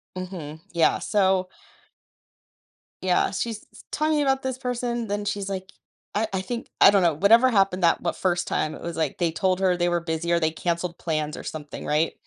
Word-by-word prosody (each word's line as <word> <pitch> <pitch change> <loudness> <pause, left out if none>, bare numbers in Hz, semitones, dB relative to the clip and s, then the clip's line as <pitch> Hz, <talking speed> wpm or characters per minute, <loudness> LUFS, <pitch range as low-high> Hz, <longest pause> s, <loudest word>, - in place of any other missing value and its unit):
Mhm, 175 -5 -6
yeah, 170 -1 +3
so 190 -3 +1 1.5
Yeah, 185 -1 +2
she's 220 +2 -4
s - - -15
talking 305 0 +1
about 270 -1 +1
this 260 -1 -2
person, 240 -2 -2
then 205 0 -2
she's, 200 -1 -2
like 190 0 -5 0.4
I 215 +1 +1
I 190 -1 -1
think 235 +5 -5
I 200 - +8
don't 200 - +4
know, 165 -2 +4
whatever 230 - +5
happened 195 -4 +2
that 170 - +4
what 170 - -1
first 175 -2 0
time, 155 - -1
it - - -11
was, 170 -1 -5
like, 155 -4 -1
they 170 -2 +1
told 185 +2 0
her 185 -2 +3
they 175 0 +1
were 175 0 +1
busy, 170 +1 -3
or 170 - +3
they 160 -1 +1
canceled 170 +1 -2
plans 155 -2 -2
or - - -8
something, 150 -2 -7
right? 155 +2 +1
185 Hz, 200 wpm, -25 LUFS, 170-205 Hz, 1.5 s, I